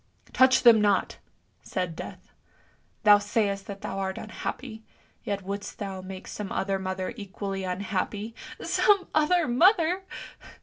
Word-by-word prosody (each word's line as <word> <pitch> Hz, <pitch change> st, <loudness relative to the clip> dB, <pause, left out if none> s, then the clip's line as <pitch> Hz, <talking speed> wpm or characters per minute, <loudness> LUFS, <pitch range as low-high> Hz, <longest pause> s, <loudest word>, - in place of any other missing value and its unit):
" -, -, -40 dB
"Touch 260 Hz, 0 st, +5 dB
them 230 Hz, -3 st, +8 dB
not! 205 Hz, -2 st, +1 dB, 0.2 s
" -, -, -42 dB
said 180 Hz, -3 st, -3 dB
Death. 185 Hz, +6 st, -9 dB, 0.7 s
'Thou 205 Hz, -1 st, +8 dB
sayst 205 Hz, -1 st, -1 dB
that 200 Hz, -1 st, -7 dB
thou 195 Hz, -, -4 dB
art 190 Hz, -1 st, -2 dB
unhappy, 220 Hz, +1 st, -6 dB, 0.4 s
yet 200 Hz, -1 st, -3 dB
wouldst 200 Hz, +2 st, -5 dB
thou 195 Hz, -3 st, -5 dB
make 185 Hz, 0 st, -9 dB
some 210 Hz, -2 st, -6 dB
other 195 Hz, 0 st, -1 dB
mother 185 Hz, +2 st, -3 dB
equally 195 Hz, -1 st, -5 dB
unhappy! 200 Hz, +3 st, -3 dB
" -, -, -10 dB
" -, -, -11 dB
Some 395 Hz, -3 st, +3 dB
other 315 Hz, +2 st, +3 dB
mother! 345 Hz, -, +4 dB
205 Hz, 150 wpm, -27 LUFS, 190-240 Hz, 0.7 s, them